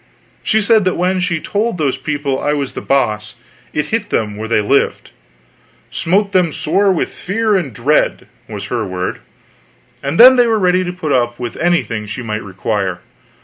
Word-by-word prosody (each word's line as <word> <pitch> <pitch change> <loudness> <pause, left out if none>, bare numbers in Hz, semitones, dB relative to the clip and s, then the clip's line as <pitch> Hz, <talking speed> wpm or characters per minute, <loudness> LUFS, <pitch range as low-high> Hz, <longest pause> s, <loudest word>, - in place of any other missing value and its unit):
She 220 - +2
said 215 0 +4
that 185 - 0
when 185 +1 +1
she 180 -2 0
told 210 +4 -2
those 145 -5 0
people 140 0 -2
I 145 - +1
was 140 -3 -2
The - - -5
Boss, 110 -6 0 0.4
it 150 - -1
hit 210 -2 -1
them 105 -2 -1
where 110 +1 -5
they 115 - +2
lived: 135 +7 0 0.8
"smote 195 +4 +1
them 180 -4 +2
sore 190 +7 +1
with 180 - -1
fear 215 +2 0
and 170 -9 -1
dread" 125 +8 +1 0.2
was - - -6
her 120 -2 0
word; 90 -2 -4 0.8
and 140 +4 -2
then 255 +2 +9
they 245 -1 +5
were 225 -1 +2
ready 185 -2 +2
to 180 - -3
put 180 -4 -4
up 120 -2 +1
with 120 -2 -5
anything 160 -11 0
she 105 +4 -5
might 110 -1 -3
require. 95 -1 -3
150 Hz, 185 wpm, -16 LUFS, 115-185 Hz, 0.8 s, then